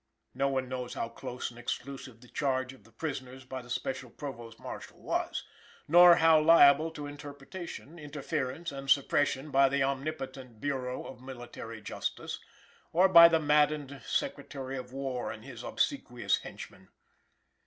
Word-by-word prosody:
No 140 - +1
one 130 -1 -1
knows 125 -1 -5
how 115 - -2
close 120 +1 -6
and 120 - -13
exclusive 125 -1 -6
the 125 - -15
charge 130 -1 -1
of 125 -6 -19
the 115 - -19
prisoners 130 0 -6
by 130 0 -6
the 120 - -15
special 130 0 -3
Provost 120 -5 -8
Marshal - - -8
was, - - -2 0.4
nor 175 +2 +9
how 160 -2 +6
liable 155 -1 +7
to 150 -2 -7
interruption, 145 +3 -8
interference 150 +1 -3
and 135 -1 -7
supersession 145 +1 +2
by 135 0 +5
the 140 0 +1
omnipotent 135 -3 -4
Bureau 130 -1 -3
of 125 -2 -10
Military 120 -3 -8
Justice, - - -4 0.5
or 180 +3 +5
by 170 -2 +11
the 165 -1 +3
maddened 150 -2 +2
Secretary 135 -1 -3
of 125 -1 -7
War 130 -2 -3
and 110 +2 -10
his 130 -4 -9
obsequious - - 0
henchmen. - - -10
135 Hz, 150 wpm, -30 LUFS, 125-150 Hz, 0.5 s, by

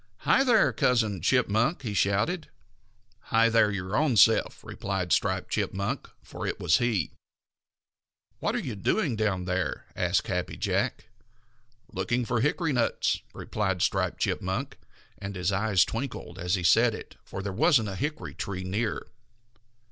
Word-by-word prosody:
"Hi, 270 - +4
there, 235 -6 +4
Cousin 110 -7 +1
Chipmunk!" 125 - +2
he 110 -4 -3
shouted. 105 - 0 0.8
"Hi, 115 +1 +3
there, 115 -2 +4
your 95 0 -3
own 140 -5 +2
self!" 110 +3 +4
replied 95 -3 -2
Striped - - 0
Chipmunk, 100 +1 -2
for - - -6
it - - -3
was 80 - +3
he. 115 - 0 1.3
"What - - -1
are - - +1
you - - -3
doing 130 - 0
down 100 -4 -1
there?" 90 -2 -2
asked 90 -4 +1
Happy 90 -1 -3
Jack. - - -1 0.9
"Looking 120 +6 -1
for 115 -1 0
hickory 150 +3 +1
nuts," 120 -2 +1
replied 95 -5 -2
Striped - - 0
Chipmunk, 120 +10 -2 0.4
and 100 0 -6
his 90 +1 0
eyes 100 -1 +3
twinkled 115 -7 -5
as 90 +2 0
he 90 - -3
said 85 - +4
it, - - -10
for 95 - -7
there 100 -1 -3
wasn't 110 +2 +3
a 95 - -5
hickory 150 +8 -4
tree 95 -2 -5
near. 105 +5 -2
105 Hz, 150 wpm, -27 LUFS, 95-120 Hz, 1.3 s, Hi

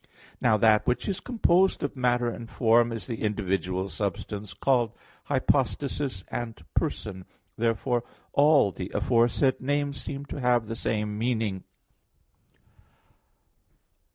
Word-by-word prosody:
Now 110 - +4
that 110 0 +4
which 125 - 0
is 195 -3 -1
composed 190 -6 +2
of 145 - -2
matter 125 -2 +1
and 115 -1 -5
form 115 0 +3
is 115 -1 -4
the 115 -3 -5
individual 95 -3 -1
substance 100 0 -4
called 120 -5 +2 0.3
"hypostasis" 135 -4 0
and 115 -2 -4
"person." 95 +5 -2 0.3
Therefore 115 +1 0 0.3
all 145 -7 +5
the 90 0 -6
aforesaid 120 +4 +2
names 145 +1 -1
seem 140 0 -6
to 140 - -6
have 120 -2 +3
the 115 +1 -5
same 105 -2 -2
meaning. 110 -5 -1
120 Hz, 120 wpm, -27 LUFS, 105-135 Hz, 0.3 s, all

